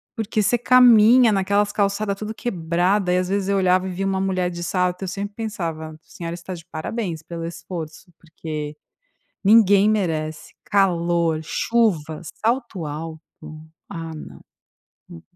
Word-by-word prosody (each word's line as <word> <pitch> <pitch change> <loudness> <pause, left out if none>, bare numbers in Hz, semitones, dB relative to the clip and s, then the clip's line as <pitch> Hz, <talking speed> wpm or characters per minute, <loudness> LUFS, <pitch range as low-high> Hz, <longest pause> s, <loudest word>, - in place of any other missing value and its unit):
porque 220 -1 -1
você 215 +5 +2
caminha 245 -1 +6
naquelas 200 +1 +1
calçada 200 0 0
tudo 215 +2 -6
quebrada 180 -2 0
e, - - +3
às 180 0 -1
vezes, 195 0 -1
eu 200 - +2
olhava 185 0 +2
e - - -4
via 190 +2 -3
uma 190 0 0
mulher 185 -2 0
de 175 0 -6
salto, 180 +1 -1
eu - - -3
sempre 200 +2 -5
pensava: 170 -8 -4
"A - - -14
senhora 170 -1 -7
está 175 +2 -8
de 170 -2 -10
parabéns 170 0 -4
pelo 165 0 -6
esforço, 170 0 -8
porque 155 -2 -6 0.7
ninguém 205 -1 +6
merece 160 -7 -2
calor, 170 -4 +1
chuvas, 165 -4 0 0.2
salto 230 - -1
alto". 155 +2 -6 0.7
Ah, 165 -1 -6
não. - - -10 0.7
Hum. 85 - -11
185 Hz, 150 wpm, -22 LUFS, 165-205 Hz, 0.7 s, caminha